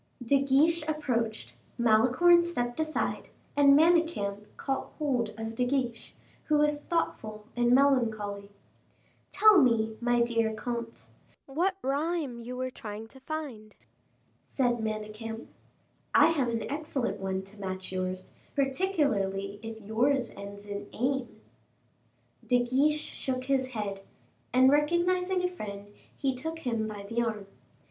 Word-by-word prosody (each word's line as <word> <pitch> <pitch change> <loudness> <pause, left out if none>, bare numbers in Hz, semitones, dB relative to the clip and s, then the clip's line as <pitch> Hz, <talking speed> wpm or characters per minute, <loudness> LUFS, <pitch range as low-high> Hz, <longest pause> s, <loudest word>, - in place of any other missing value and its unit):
De 275 +3 +4
Guiche 295 +5 +3
approached, 245 -8 -2 0.2
Malicorne 250 +10 +5
stepped 245 -7 -2
aside, 315 0 -1 0.3
and 280 -1 +7
Manicamp 315 -12 +2
caught 270 -1 -3
hold 255 -7 0
of 225 0 -4
De 250 - 0
Guiche, 245 -2 -2 0.3
who 305 - +3
was 295 0 +2
thoughtful 215 -10 -2
and 240 0 +2
melancholy. 220 -7 +2 0.8
"Tell 425 -5 +6
me, 225 -4 +2
my 240 0 +2
dear 230 -2 0
comte, 235 0 -5 0.4
what 350 +8 0
rhyme 285 -2 -1
you 245 +2 -7
were 255 0 -2
trying 215 -1 -7
to 265 - -16
find," 265 -7 -6 0.7
said 245 -3 0
Manicamp. 220 +1 -5 0.7
"I - - +7
have 275 -7 +1
an 230 -1 -2
excellent 290 -4 -3
one 190 0 -2
to 200 +2 -11
match 185 -1 -5
yours, 185 0 -3 0.2
particularly 265 - 0
if 225 0 -7
yours 245 +4 +1
ends 200 +1 -9
in 205 0 -6
ame." 260 0 -2 1.0
De 245 -1 +3
Guiche 280 +5 +2
shook 255 -3 -3
his 260 -1 +1
head, 210 -5 -4 0.5
and 260 +1 +6
recognizing 360 +5 +2
a - - +3
friend, 205 - -8 0.3
he 270 -2 0
took 320 +6 -5
him 230 -8 -2
by 205 -2 -7
the 230 +3 0
arm. 215 -3 -2
245 Hz, 130 wpm, -29 LUFS, 215-290 Hz, 1.0 s, and